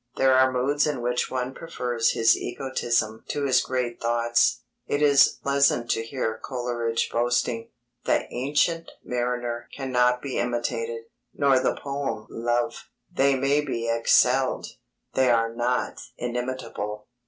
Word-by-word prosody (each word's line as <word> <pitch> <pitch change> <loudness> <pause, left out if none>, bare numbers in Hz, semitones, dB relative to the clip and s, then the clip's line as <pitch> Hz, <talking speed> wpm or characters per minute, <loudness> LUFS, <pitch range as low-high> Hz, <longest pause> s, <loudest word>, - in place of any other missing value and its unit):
There 135 0 +4
are 130 0 +5
moods 140 +4 +1
in 140 -5 -2
which 125 0 0
one 130 0 -3
prefers 125 -8 -1
his 115 0 +4
egotism 120 -4 -2
to 145 - -2
his 130 - +4
great 125 -2 -3
thoughts. 120 0 +2 0.2
It 145 - 0
is 140 -2 +5
pleasant 140 -4 +2
to 115 - +1
hear 115 -2 -3
Coleridge 120 -3 -2
boasting; 120 -1 0 0.4
"The - - +2
Ancient 150 +6 0
Mariner 120 -1 -3
cannot 125 -2 +1
be 140 -2 -3
imitated, 120 -1 -2 0.3
nor 140 -2 +4
the - - 0
poem 140 -6 -4
Love. 120 +1 -2 0.3
_They 135 -1 +3
may 140 +2 +2
be 115 -5 -3
excelled; 125 +3 +3 0.5
they 130 -1 +3
are 115 -1 +2
not 120 +1 -1 0.2
imitable. 120 -4 -4
125 Hz, 130 wpm, -25 LUFS, 120-135 Hz, 0.5 s, are